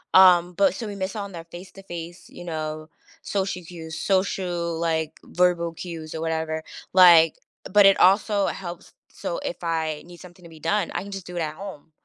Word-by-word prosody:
Um, 180 -2 +7
but 195 +1 +3
so 225 +3 -5
we 205 - -6
miss 190 +2 -4
out 205 -2 -3
on 200 - -10
their 165 -1 -7
face 175 +3 -11
to 195 - -13
face, 175 -1 -8
you 175 - -11
know, 155 -2 -4 0.3
social 195 -2 -2
cues, 160 -2 -8
social, 180 -3 0
like, 160 -2 -1
verbal 175 -2 +1
cues 165 -2 -7
or 160 - -4
whatever, 160 -1 -2 0.3
like, 170 -3 +8 0.4
but 205 0 +7
it 195 0 +6
also 200 +1 +4
helps, 175 -2 -7 0.2
so 170 - -5
if 175 - -5
I 160 -2 -1
need 175 -1 -13
something 180 0 -14
to 170 - -12
be 160 -1 -14
done, 210 +6 0
I - - -1
can 200 - -9
just 195 -2 -7
do 180 - -8
it 175 - -1
at 155 -1 -2
home. 185 -5 -9
175 Hz, 205 wpm, -24 LUFS, 165-190 Hz, 0.4 s, like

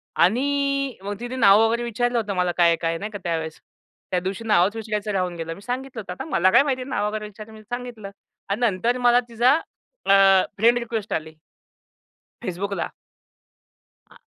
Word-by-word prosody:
आणि 275 +6 +1
मग 200 0 -5
तिने 245 +2 -5
नाव 200 -5 +6
वगैरे 230 +2 0
विचारलं 240 +1 -1
होतं 210 -3 -1
मला 180 -1 +1
काय 175 -1 +5
आहे, 170 - +4
काय 165 0 -1
नाही? 210 +4 -6
का 205 - -5
त्यावेळेस. 160 -2 -3 0.5
त्या 180 - +2
दिवशी 190 +5 -4
नावच 205 0 +3
विचारायचं 215 -1 -3
राहून 185 -2 -1
गेलं. 165 0 -5
मी 195 - -13
सांगितलं 250 0 -5
होतं, 180 -3 -7
आता - - -7
मला 185 -4 +3
काय - - +6
माहिती 265 -3 -1
आहे 255 - -7
नाव 210 -5 0
वगैरे 215 0 -4
विचारलं, 210 +1 -11
मी 215 - -12
सांगितलं 240 -3 -7 0.4
आणि 200 - -1
नंतर 230 +2 +1
मला 245 -1 +4
तिचा 235 +2 +3 0.5
अ, - - +5 0.4
फ्रेंड 235 +4 +4
रिक्वेस्ट 225 -3 -4
आली. 160 0 -3 1.1
Facebookला. 200 0 -3 1.2
आ - - -18
215 Hz, 180 wpm, -23 LUFS, 185-245 Hz, 1.2 s, नाव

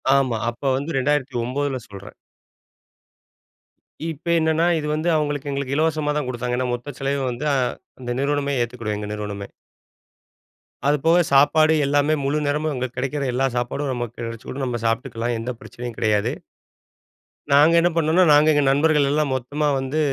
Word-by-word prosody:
ஆமா. 130 -4 +1
அப்ப 120 +4 -10
வந்து 145 +5 -3
2009ல 135 0 -1
சொல்றேன். 100 0 -11 2.0
இப்ப 165 +3 -7
என்னன்னா, 160 +1 +2
இது 150 -1 -3
வந்து 155 +3 0
அவுங்களுக்கு 145 -2 -1
எங்களுக்கு 140 0 -2
இலவசமா 155 -1 +1
தான் 145 -4 -2
கொடுத்தாங்க. 125 0 -2
ஏன்னா 130 - 0
மொத்த 120 +4 -5
செலவயும் 135 -1 -1
வந்து, 125 +6 -5
அ, - - +2 0.4
அந்த 120 -1 -5
நிறுவனமே 140 0 0
ஏத்துக்குடும். 115 -3 -3
எங்க 105 0 -5
நிறுவனமே. 105 -1 -5 1.4
அது 145 +1 +3
போக 170 +2 +5
சாப்பாடு 155 +3 +5
எல்லாமே 145 +2 +2
முழு 145 +2 0
நேரமும் 150 +1 0
அங்க 130 0 -2
கிடைக்கிற 135 +3 -2
எல்லா 135 +2 +1
சாப்பாடும் 130 +3 -2
நமக்கு 120 -1 -5
கிடைச்சுடும். 115 +4 -6
நாம்ம 120 -2 -2
சாப்புட்டுக்கலாம். 115 0 -1
எந்த 125 +3 -3
பிரச்சனையும் 120 -1 -8
கிடையாது. 105 -2 +1 1.2
நாங்க 150 +4 +6
என்ன 175 +1 +3
பண்ணம்னா, 165 +3 +3
நாங்க 150 +1 +6
எங்க 145 - +3
நண்பர்கள் 145 0 +3
எல்லாம் 150 -1 +1
மொத்தமா 145 +4 -2
வந்து 135 +4 -2
140 Hz, 150 wpm, -22 LUFS, 120-150 Hz, 2.0 s, நாங்க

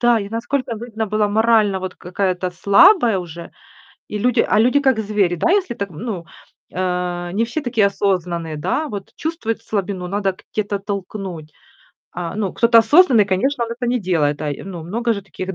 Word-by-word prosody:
Да, 240 -1 +4
я, 200 -2 -5
насколько, 235 +2 -2
видно, 220 -1 -4
была 210 0 +1
морально, 215 -2 +3
вот, 185 -1 -5
какая-то 185 0 -2
слабая 210 - +5
уже. 170 -1 -8 0.6
И 210 - -4
люди 240 +3 +2
а - - +2
люди. 250 +5 +4
как 265 -5 +2
звери, 205 -4 +1
да, 175 - +1
если 385 -7 +1
так, 200 -3 -4
ну, 185 0 -5 0.5
э, 180 -1 -2
не 215 +4 +1
все 240 +7 -3
такие 230 -6 +2
осознанные, 175 -5 -1
да. 300 - -1
Вот 205 -5 -7
чувствуют 270 -9 -3
слабину, 195 -4 -3
надо 195 0 -1 0.2
где-то 205 -1 -1
толкнуть. 195 -5 -6 0.6
А, 175 -1 -5
ну, 205 -3 -2
кто-то 230 0 +5
осознанный, 240 - +6
конечно, 235 +7 0
он 230 - -8
это 245 +1 -4
не 245 0 0
делает, 155 -6 0
да. 150 - -3
И, 145 - -6
ну, 180 -4 -7
много 230 +8 -1
же 200 -2 -4
таких, 190 +1 -6
205 Hz, 180 wpm, -20 LUFS, 180-230 Hz, 0.6 s, осознанный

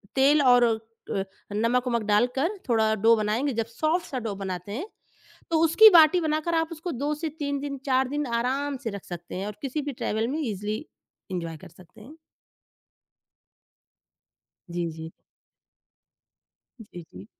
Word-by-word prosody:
तेल 280 +3 +5
और 245 -2 +6
अ, 225 -3 -3 0.3
नमक-वमक 235 +2 +1
डालकर 250 - +1
थोड़ा 220 -2 +3
डो 225 +3 +5
बनाएँगे। 225 +6 0
जब 230 0 -1
सॉफ्ट 310 +10 -1
सा 260 - -4
डो 220 -4 -4
बनाते 190 0 -5
हैं, 285 - -4 0.7
तो 320 - +3
उसकी 435 +7 +8
बाटी 335 +1 +7
बनाकर 310 +2 0
आप 325 -1 +1
उसको 330 +2 -5
2 285 +4 -2
से 320 +2 -3
3 285 -1 -2
दिन, 280 -1 -5
4 265 -1 +2
दिन 295 +1 -2
आराम 260 +4 -1
से 225 - -2
रख 200 -2 -8
सकते 175 0 -8
हैं 190 +2 -3
और 210 - -6
किसी 280 +2 -3
भी 285 0 -4
ट्रेवल 225 -1 -2
में 295 +5 -2
इज़िली 215 - -3 0.5
एन्जॉय 165 -3 -4
कर - - -13
सकते 185 +3 -18
हैं। 270 +9 -13 2.6
जी, 170 -1 -2
जी। 160 0 -8 1.7
जी, 190 -5 -10
जी। 95 +2 -11
245 Hz, 155 wpm, -26 LUFS, 210-290 Hz, 2.6 s, उसकी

